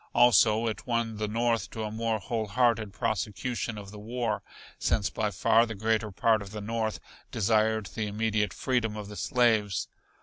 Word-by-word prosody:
Also 115 -2 +5
it 110 +2 -3
won 115 -2 -1
the 105 0 -1
North 115 +1 0
to 110 - -5
a 105 - -3
more 115 0 -1
whole 110 +1 -3
hearted 115 -2 +2
prosecution 110 +3 -2
of 100 -1 -9
the 105 - -10
war, 110 -1 -2 0.4
since 100 - +1
by 110 -1 -1
far 115 +4 +3
the 110 - -5
greater 110 +1 0
part 110 +2 +2
of 100 - -8
the 105 +1 -6
North 110 +1 -2 0.3
desired 110 0 +2
the 110 +2 -4
immediate 105 0 0
freedom 120 -5 -1
of 105 -1 -6
the 105 - -8
slaves. 110 -2 +1
110 Hz, 175 wpm, -28 LUFS, 105-115 Hz, 0.4 s, Also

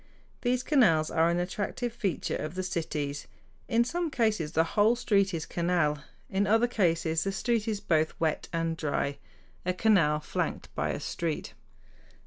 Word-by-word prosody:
These 250 0 +1
canals 170 - +3
are 165 +1 +3
an 170 - +1
attractive 205 +6 -2
feature 200 -9 -2
of 155 +3 -4
the 185 - -2
cities. 150 -5 -3 0.4
In 235 -1 +3
some 340 +7 -2
cases 215 - 0
the 160 - +4
whole 215 +3 +4
street 200 -5 +2
is 165 -4 -3
canal; 170 -4 0 0.2
in 195 +1 0
other 225 +3 +4
cases 165 -8 +1
the 195 - -1
street 230 +2 0
is 215 -2 -1
both 160 -4 0
"wet 160 -2 0
and 165 -1 -1
dry" 145 -2 -2 0.4
a 180 - 0
canal 180 -8 +3
flanked 150 - -3
by - - -1
a - - -2
street. 165 -3 -3
180 Hz, 160 wpm, -29 LUFS, 160-220 Hz, 0.4 s, the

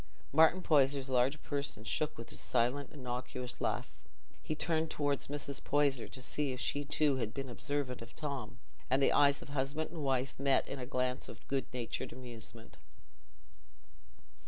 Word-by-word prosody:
Martin 160 +4 +6
Poyser's 140 -2 +3
large 130 +4 +3
person 140 -6 -2
shook 150 +6 0
with 115 - -8
his - - -9
silent 125 +3 +1
unctuous 125 -2 -4
laugh. - - -2 0.4
He 155 - -2
turned 160 0 +1
towards 145 -3 0
Mrs. 140 -1 -3
Poyser 140 -4 +2
to 130 - -8
see 145 +1 -1
if 125 - -6
she 145 +3 0
too 145 -1 +2
had 110 -4 -2
been 135 -1 -3
observant 130 0 -2
of 115 +1 -10
Tom, 140 -6 -4 0.3
and 130 +1 +4
the 135 - +4
eyes 140 -1 +5
of - - -13
husband 145 +3 -1
and 165 -3 -5
wife 130 -1 +1
met 140 -1 +3
in 140 - -4
a 125 - -4
glance 125 -1 -1
of - - -11
good 135 -2 0
natured 120 -2 -3
amusement. 115 -2 -9
135 Hz, 165 wpm, -34 LUFS, 125-145 Hz, 0.4 s, Martin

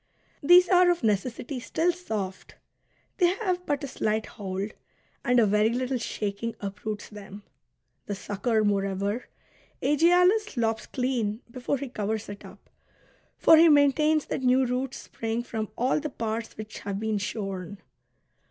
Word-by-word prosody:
These 355 +4 +7
are 360 -1 +5
of 345 -5 +1
necessity 235 +5 -1
still 325 +7 +1
soft; 215 - -5 0.6
they 360 - +4
have 370 -4 -2
but 290 -1 -1
a - - -2
slight 220 -4 -1
hold, 195 0 -5 0.5
and 245 0 +3
a 230 - +5
very 210 +2 +3
little 255 +2 -1
shaking 215 0 -3
uproots 210 +1 -5
them. 205 -1 -10 0.6
The 205 - -2
sucker, 215 +3 -1
moi'eover, 200 +2 0 0.5
Aegialus 360 - +3
lops 225 -1 0
clean 245 -4 -1
before 255 +3 -2
he 280 - -5
covers 220 -2 -3
it 205 0 -8
up. 195 +1 -14 0.7
For 325 - +7
he 330 +1 +7
maintains 300 +1 +4
that - - -3
new 255 +1 +3
roots 255 +2 -2
spring 225 +1 -4
from 220 -3 -4
all 255 +5 +2
the 305 0 -4
parts 225 -2 -4
which 215 0 -8
have 200 -1 -4
been 220 -1 -1
shorn. 195 -2 -4
230 Hz, 145 wpm, -27 LUFS, 205-280 Hz, 0.7 s, These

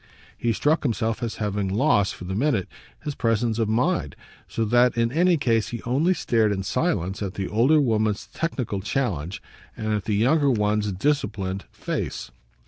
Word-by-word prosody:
He 120 - 0
struck 150 +8 +2
himself 115 -3 -1
as 115 -2 -3
having 105 -2 -2
lost, 105 0 +2
for - - -10
the 95 - -4
minute, 115 -3 +1 0.4
his 150 - -3
presence 115 -2 0
of 110 -2 +1
mind 120 - 0 0.3
so 115 - -1
that 120 +2 +3
in 115 0 +2
any 175 +4 +3
case 115 -6 +1
he 120 - -6
only 150 +10 +2
stared 110 -8 +2
in 95 -1 -2
silence 95 - -1
at 100 -1 -4
the 95 - -2
older 130 +9 +4
woman's 110 -6 +1
technical 125 -11 -2
challenge 100 - -2 0.3
and 110 -1 -1
at 105 -2 -2
the 110 -2 0
younger 140 +7 +3
one's 105 -3 +1
disciplined 100 -5 -1
face. - - -4
115 Hz, 170 wpm, -24 LUFS, 105-135 Hz, 0.4 s, older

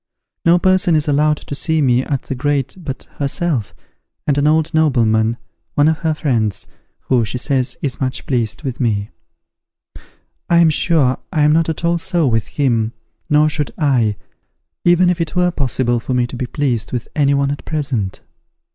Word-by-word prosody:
No 170 +1 +6
person 185 -1 +3
is 155 0 +1
allowed 150 +1 +2
to - - -8
see 160 +3 0
me 125 -4 +3
at 140 -2 -2
the - - -4
grate 140 0 -1
but 140 -6 -6 0.2
herself, 140 -4 -1 0.5
and 145 - +2
an 145 +1 +2
old 160 +2 +2
nobleman, 115 -7 +2 0.4
one 145 +1 +4
of 160 -1 +1
her 160 -2 0
friends, 115 -10 -1 0.4
who, 125 -3 +1
she 115 +3 -4
says 130 0 -1
is 140 -2 -3
much 130 0 -2
pleased 120 -1 -1
with 130 -4 -4
me. 105 -4 -1 1.4
I 170 - +4
am 170 -2 +5
sure 150 -5 +2
I 155 -5 +1
am 150 +1 +4
not 165 0 +2
at 160 +1 -3
all 170 0 +2
so 175 -2 0
with 115 -4 0
him, 120 -5 0 0.4
nor 150 +1 +4
should 150 -1 -1
I, 125 -8 +2 0.7
even 175 +1 +4
if 175 -1 +1
it 165 0 -3
were 180 0 +2
possible 125 -5 0
for 125 +2 -3
me 125 -1 +2
to 120 - -8
be 125 0 -3
pleased 125 -5 -1
with 120 -3 -3
any 140 -2 +3
one 140 0 +1
at 145 - -5
present. 130 -11 -3
140 Hz, 180 wpm, -18 LUFS, 125-160 Hz, 1.4 s, No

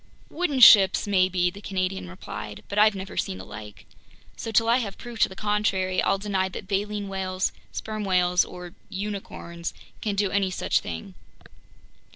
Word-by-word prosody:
"Wooden 305 -6 -1
ships 195 -5 +8
maybe," 185 -3 +2
the 200 - -11
Canadian 185 - -2
replied. 105 +3 -8
"But 200 - -1
I've 215 -1 +6
never 190 0 -7
seen 95 - -2
the 95 - -9
like. 105 0 -10 0.5
So - - -6
till 225 +1 +3
I 235 +2 +5
have 205 -6 -4
proof 240 -2 -9
to - - +4
the 190 - -10
contrary, 200 -3 0
I'll 195 - +2
deny 195 -2 -1
that 190 - -8
baleen 205 +1 -2
whales, 190 -1 -1 0.2
sperm 215 -1 -4
whales, 180 -2 +3
or 180 -1 -9 0.2
unicorns 190 -4 -5 0.3
can 210 -2 -1
do 200 -1 +1
any 195 -1 +1
such 185 - +1
thing." 85 +3 -7
195 Hz, 170 wpm, -25 LUFS, 180-210 Hz, 0.5 s, ships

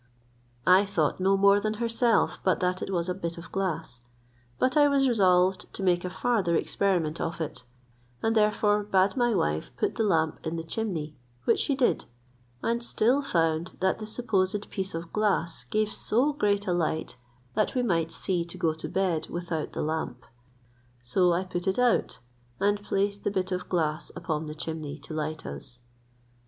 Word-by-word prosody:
I 185 +2 +7
thought 190 -7 0
no 195 +1 +3
more 200 +1 +5
than 215 +1 -1
herself 230 +1 +1
but 185 - +2
that 180 0 0
it - - -4
was 170 -2 0
a 180 - 0
bit 170 -2 -5
of 170 - -10
glass, 165 -10 -3 0.6
but 255 0 +1
I 295 -1 +6
was 275 -1 +3
resolved 185 -5 +3
to 195 - -4
make 175 -2 +2
a 180 - -2
farther 190 -2 +1
experiment 170 -4 0
of 165 +1 -3
it; 155 -5 -5 0.6
and 225 0 +2
therefore 210 -1 +3
bade 195 -1 +2
my 240 -3 +2
wife 80 - 0
put - - 0
the 225 - +2
lamp 160 -6 +1
in 160 +1 -3
the 165 - -3
chimney, 165 -5 -3 0.3
which - - +3
she 280 - +1
did, 260 -2 +1 0.6
and 235 +1 0
still 240 +4 +2
found 165 - 0
that 190 +3 +1
the 215 - -6
supposed 205 -3 -1
piece 190 -2 -3
of 165 0 -6
glass 200 -6 0
gave 215 0 0
so 265 +7 +1
great 205 -7 +1
a 180 - +1
light, 160 -4 -1 0.4
that 215 +5 0
we 250 - +2
might 165 -7 +1
see 175 +1 -1
to 170 - -10
go 160 -1 +1
to 160 - -7
bed 185 -5 0
without 170 -3 -3
the - - -2
lamp. 150 -6 -3 0.8
So 175 +9 +3
I 175 +2 +1
put 180 0 -4
it 190 - +1
out, 245 - +2 0.4
and 205 +1 +2
placed 200 0 -1
the - - +1
bit 190 -1 -2
of 180 0 -3
glass 160 -2 -1
upon 160 -2 -3
the 150 - -6
chimney 155 -2 -5
to 145 +2 -10
light 155 +1 -3
us. 125 -2 -8
185 Hz, 185 wpm, -27 LUFS, 165-210 Hz, 0.8 s, I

